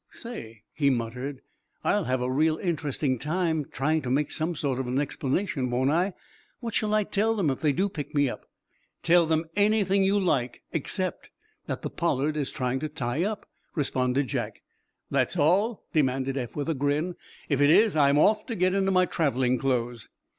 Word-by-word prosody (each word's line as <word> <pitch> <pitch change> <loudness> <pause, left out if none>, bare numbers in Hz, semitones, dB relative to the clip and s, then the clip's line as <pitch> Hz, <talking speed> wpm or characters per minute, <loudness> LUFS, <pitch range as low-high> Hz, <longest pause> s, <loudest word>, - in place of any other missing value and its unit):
"Say," 115 - -9
he 140 -3 +2
muttered, 125 +2 -3 0.4
"I'll 205 -4 +1
have 130 0 0
a 125 - -1
real 155 +4 +2
interesting 145 -6 -1
time 160 0 0
trying 155 +1 0
to 130 - -4
make 140 +3 +1
some 165 +2 -1
sort 140 -4 -1
of 130 - -2
an 125 +2 -1
explanation, 140 0 -1
won't 130 +3 +1
I? 180 +5 +1 0.5
What 230 -3 -5
shall 215 0 +1
I 215 - +3
tell 215 +3 +1
them 180 -9 +1
if 135 - -4
they 150 - +3
do 190 +9 +1
pick 150 -6 -7
me 145 -1 +4
up?" - - -6 0.6
"Tell 170 -1 +4
'em 160 +1 +2
anything 205 -2 +3
you 195 +2 +3
like, 130 -10 0
except - - -3 0.4
that - - -4
the - - -3
'Pollard' 145 +4 0
is 145 -3 -1
trying 125 +1 -2
to 155 - -3
tie 140 -1 -2
up," 210 +1 -3 0.3
responded 130 -2 +1
Jack. 120 - -4 0.5
"That 135 +5 +1
all?" 190 +9 +2
demanded 135 -3 +1
Eph, 125 -4 -4
with 145 +2 -2
a - - +2
grin. 145 +5 0 0.3
"If 140 -2 +1
it 145 - +5
is, 210 +5 +5
I'm 140 -1 +4
off 210 +8 +3
to 230 - -3
get 185 0 +2
into 195 -1 +2
my 185 -1 +4
traveling 130 -7 +1
clothes." 120 -4 -1
150 Hz, 190 wpm, -27 LUFS, 130-185 Hz, 0.6 s, it